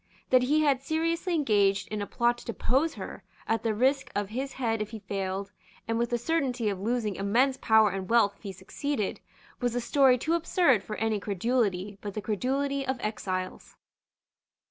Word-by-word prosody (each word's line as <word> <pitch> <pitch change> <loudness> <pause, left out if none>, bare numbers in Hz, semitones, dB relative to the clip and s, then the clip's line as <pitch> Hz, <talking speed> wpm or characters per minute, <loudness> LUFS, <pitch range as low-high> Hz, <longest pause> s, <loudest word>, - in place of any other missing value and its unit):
That 255 -1 +6
he 295 +5 +2
had 280 -4 +2
seriously 330 +4 -1
engaged 200 -9 +2
in 215 -1 -3
a 205 - -3
plot 240 0 +1
to - - -13
depose 265 +7 0
her, - - -7 0.3
at 225 -1 +1
the 225 -2 0
risk 265 +5 +1
of 205 -1 -1
his 265 +5 -4
head 225 -4 -1
if 210 - -3
he 225 - -7
failed, 195 -1 -4 0.4
and 225 0 0
with 235 0 0
the 240 - +1
certainty 250 -4 0
of 195 -2 -3
losing 215 -1 -1
immense 240 +7 +2
power 220 -1 +4
and 190 0 -5
wealth 225 -4 +4
if - - -31
he 200 - -6
succeeded, 205 +5 -3 0.4
was 245 -1 -1
a - - +1
story 260 +1 +4
too 315 +7 -1
absurd 335 - +3
for 215 - -5
any 220 -1 0
credulity 205 -1 -1
but 205 -2 -6
the - - -1
credulity 275 +6 -1
of 265 -1 -2
exiles. 185 -4 -4
230 Hz, 190 wpm, -28 LUFS, 205-265 Hz, 0.4 s, That